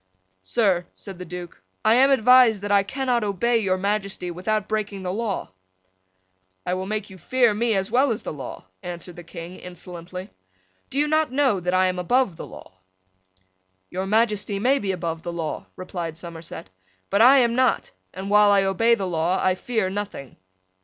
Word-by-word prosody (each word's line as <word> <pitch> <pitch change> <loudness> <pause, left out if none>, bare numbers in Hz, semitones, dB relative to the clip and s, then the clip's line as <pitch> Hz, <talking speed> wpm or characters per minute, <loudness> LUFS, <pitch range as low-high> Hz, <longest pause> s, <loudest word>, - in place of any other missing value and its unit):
"Sir," 180 - +1
said 190 -3 -9
the 180 - -6
Duke, 175 - -8 0.2
"I 220 - +6
am 265 +3 +6
advised 250 -4 +5
that 205 - -2
I 200 -1 +6
cannot 250 +2 -1
obey 220 +4 +1
your 190 -3 +1
Majesty 195 -2 -2
without 210 +4 -1
breaking 210 -3 -3
the 180 0 -2
law." 215 - -3 1.1
"I 180 - 0
will 185 +1 -3
make 210 -1 -3
you 190 - -12
fear 240 +5 +3
me 225 +1 +1
as 195 +2 -1
well 260 +4 +4
as 220 - -3
the - - -4
law," 135 -9 -8 0.2
answered 175 0 -7
the 175 - -10
King, 170 +1 -9
insolently. 180 +1 -9 0.6
"Do 270 - -6
you 295 +1 +3
not 310 -2 +2
know 265 -7 +2
that 180 +1 -1
I 185 0 +4
am 185 -1 -1
above 245 +1 +1
the - - -8
law?" 95 - -13 1.1
"Your 190 +1 -3
Majesty 210 -1 +1
may 260 +7 +2
be 195 -1 -1
above 165 -3 -3
the 175 - -5
law," 165 -2 -4
replied 175 -3 -5
Somerset; 165 - -8 0.4
"but 200 - +3
I 260 +4 +8
am 240 -3 +3
not; 255 +1 +1 0.2
and, 190 +2 -6
while 210 0 +6
I 200 -1 +5
obey 225 +5 +3
the 195 - -3
law, 175 +1 0
I 185 - +2
fear 220 +1 -1
nothing." 195 - -5
195 Hz, 185 wpm, -24 LUFS, 180-225 Hz, 1.1 s, I